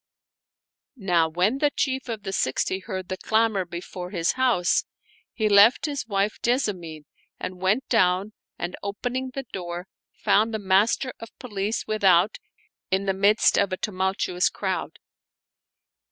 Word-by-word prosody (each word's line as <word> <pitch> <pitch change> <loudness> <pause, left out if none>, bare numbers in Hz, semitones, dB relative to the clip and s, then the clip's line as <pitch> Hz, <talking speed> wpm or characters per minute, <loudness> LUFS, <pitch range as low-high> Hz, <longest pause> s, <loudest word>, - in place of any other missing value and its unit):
Now 175 -6 +2
when 185 +11 +1
the 295 - +3
Chief 265 -2 -2
of 220 -3 -4
the 195 -2 -4
Sixty 185 +5 0
heard 190 -2 -6
the 185 - -4
clamor 220 -2 +1
before 180 +1 -7
his 170 -3 0
house, 245 -9 +2 0.5
he 220 -2 0
left 210 +7 +6
his 285 -6 -3
wife 200 0 -1
Jessamine 185 - -1 0.3
and 185 0 -6
went 205 +8 +1
down 190 -1 +2 0.2
and, 175 +1 -4
opening 245 +6 -3
the 270 -1 -4
door, 175 -1 -5 0.3
found 220 +2 +2
the - - -2
Master 205 +6 +2
of 230 - -9
Police 210 -3 -3
without 200 -3 +3 0.5
in 190 +1 0
the 195 - +1
midst 200 +3 +4
of 200 -1 +1
a 185 - -2
tumultuous 190 -2 0
crowd. - - -3
200 Hz, 140 wpm, -25 LUFS, 185-225 Hz, 0.5 s, left